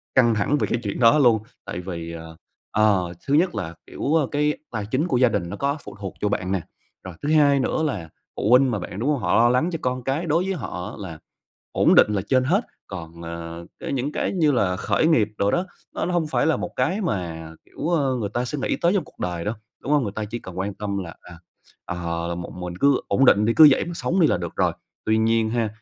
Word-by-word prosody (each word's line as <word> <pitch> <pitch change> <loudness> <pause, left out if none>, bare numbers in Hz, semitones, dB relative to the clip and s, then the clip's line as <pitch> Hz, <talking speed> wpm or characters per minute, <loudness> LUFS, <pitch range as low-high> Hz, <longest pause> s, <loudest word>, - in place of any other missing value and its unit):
căng 120 -3 +5
thẳng 120 +8 +1
về - - 0
cái 115 - -1
chuyện 100 +2 -3
đó 120 +5 +6
luôn. 120 -6 +4 0.2
Tại - - -5
vì, 85 -2 -6
ờ, 80 -1 -9 0.4
ờ, 100 -5 +2
thứ 140 - +1
nhất 175 +4 +3
là, 80 +1 -4
kiểu, 150 - -1
ơ, 155 -4 +3
cái 150 0 +1 0.2
tài 110 -4 -3
chính 130 +10 0
của 130 - +1
gia 125 -1 +5
đình 90 -6 -2
nó - - -5
có 140 +2 -1
phụ - - -10
thuộc 95 -3 -5
vô 105 - +1
bạn 95 0 -2
nè. 95 -3 0 0.4
Rồi 95 -2 -8
thứ 145 - -2
hai 145 -3 +5
nữa 155 - 0
là 100 - -2 0.3
phụ 105 - -1
huynh 130 +1 +6
mà 105 - -1
bạn, 95 +2 -7
đúng 135 +6 0
hông? 145 - +1
Họ 110 - +1
lo 120 +1 +5
lắng 125 +8 +2
cho 165 - -3
con 125 -1 -2
cái, 140 +7 -1
đối 165 +3 +2
với 195 - -1
họ 105 - -5
là 85 -6 -7 0.5
ổn - - +4
định 105 - +6
là 95 - 0
trên 130 -1 +3
hết. 180 - +3 0.3
Còn, 85 -3 -8
ờ, 85 0 -7
cái - - -5
những 135 +3 -1
cái - - -1
như 160 -6 +3
là 100 -8 +1
khởi 155 - +1
nghiệp 115 -11 +3
đồ 100 - +2
đó, 180 - 0 0.3
nó - - -2
hông 175 -2 0
phải 150 - +1
là 160 - +3
một - - -5
cái 160 +11 0
mà, 85 - -3
kiểu, - - -5
ơ, 145 -7 +1
người 105 -4 -2
ta 120 - 0
sẽ 145 +4 -4
nghĩ - - 0
tới 170 +2 +2
trong 185 -6 +1
cuộc - - -20
đời 85 -2 -3
đâu, 105 +3 -1 0.3
đúng 145 - -2
hông? 145 - +4
Người 100 -4 -3
ta 110 +1 -3
chỉ 115 +3 -5
cần 95 -5 -9
quan 95 +1 -2
tâm 100 -1 -3
là, 85 - -9
à, 85 -2 -13 0.5
ờ, 85 -1 -3
là 85 - -2
một, 85 0 -6
mình 90 -1 -6
cứ 140 +7 +3
ổn 135 - +3
định 105 -4 +5
đi, 115 - +3
cứ 155 -2 +9
vậy 130 - +2
mà 175 - -6
sống 180 +2 0
đi 165 - +6
là - - +2
được 85 -2 -6
rồi. - - +2 0.3
Tuy 110 0 +2
nhiên 115 0 +2
ha, 115 -2 0
115 Hz, 265 wpm, -23 LUFS, 90-145 Hz, 0.5 s, cứ